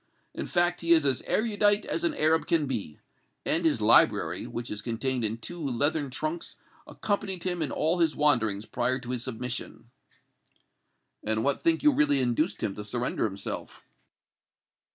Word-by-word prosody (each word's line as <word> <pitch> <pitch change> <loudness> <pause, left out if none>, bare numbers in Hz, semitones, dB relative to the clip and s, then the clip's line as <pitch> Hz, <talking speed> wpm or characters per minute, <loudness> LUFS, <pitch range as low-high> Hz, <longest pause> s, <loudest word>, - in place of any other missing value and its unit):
In - - -5
fact, 175 0 +1
he 170 0 +4
is 160 -3 +5
as 135 -3 +2
erudite 210 -2 +2
as 165 - -2
an 170 - +1
Arab 160 +1 +2
can 165 -3 +2
be, 115 - -4 0.5
and 165 +2 +2
his 155 -9 +2
library, 110 +2 +3
which 120 0 -5
is 105 0 -2
contained 125 +2 -1
in 110 +1 -1
two 175 +9 -7
leathern 145 +2 0
trunks, 155 +5 -3 0.3
accompanied 200 -3 -3
him 180 -2 -2
in 150 - 0
all 165 +3 +1
his 165 -2 +2
wanderings 110 -9 +1
prior 125 +3 -1
to 125 -1 -7
his 125 -2 -1
submission." 125 -1 -5 1.3
"And 110 +1 0
what 140 0 0
think 330 -2 +1
you 300 - +6
really 145 - +2
induced 130 +7 0
him 100 - -1
to 105 - -5
surrender 120 +4 -2
himself?" 100 -2 -6
140 Hz, 165 wpm, -27 LUFS, 120-170 Hz, 1.3 s, you